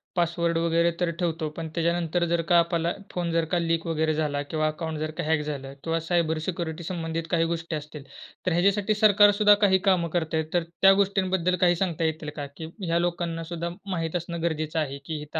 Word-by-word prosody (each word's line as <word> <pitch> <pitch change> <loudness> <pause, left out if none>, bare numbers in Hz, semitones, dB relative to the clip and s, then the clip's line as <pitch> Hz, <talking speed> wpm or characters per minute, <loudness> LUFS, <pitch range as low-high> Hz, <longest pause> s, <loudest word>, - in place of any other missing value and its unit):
Password 170 -1 +1
वगैरे 170 +1 +2
तर 175 -1 +1
ठेवतो. 165 -3 -1
पण 165 -1 -4
त्याच्यानंतर 170 0 0
जर 170 0 +1
का 175 - +6
आपल्याला 170 0 0 0.2
फोन 175 -1 -2
जर 165 0 +1
का 180 - +2
लीक 165 0 0
वगैरे 160 -1 +1
झाला 150 -2 -1
किंवा 155 +1 -1
अकाउंट 160 0 -4
जर 155 0 -2
का - - -1
हॅक 155 0 +1
झालं 140 -2 -5
किंवा 165 0 0
सायबर 165 -1 0
सिक्युरिटी 170 -2 -4
संबंधित 165 -1 -3
काही 165 -1 +3
गोष्टी 165 0 -3
असतील. 150 -1 -7 0.4
तर 185 - +1
ह्याच्यासाठी 200 +4 +2
सरकारसुद्धा 205 0 +6
काही 190 -1 +5
कामं 175 -3 +2
करता 160 -1 -1
आहे. 160 - 0
तर 175 -1 +2 0.2
त्या 195 0 +8
गोष्टींबद्दल 190 -2 +1
काही 175 -1 +5
सांगता 170 -2 -1
येतील 160 -1 -2
का? 145 - -4
की 160 - -6 0.2
ह्या 170 0 +1
लोकांना 170 -1 -2
सुद्धा 170 +1 -4 0.2
माहित 165 -2 -2
असणं 170 -1 -3
गरजेचं 160 -1 -1
आहे. 140 -3 -2
की 155 -2 -4
इथं 150 +2 -5
165 Hz, 205 wpm, -26 LUFS, 160-175 Hz, 0.4 s, त्या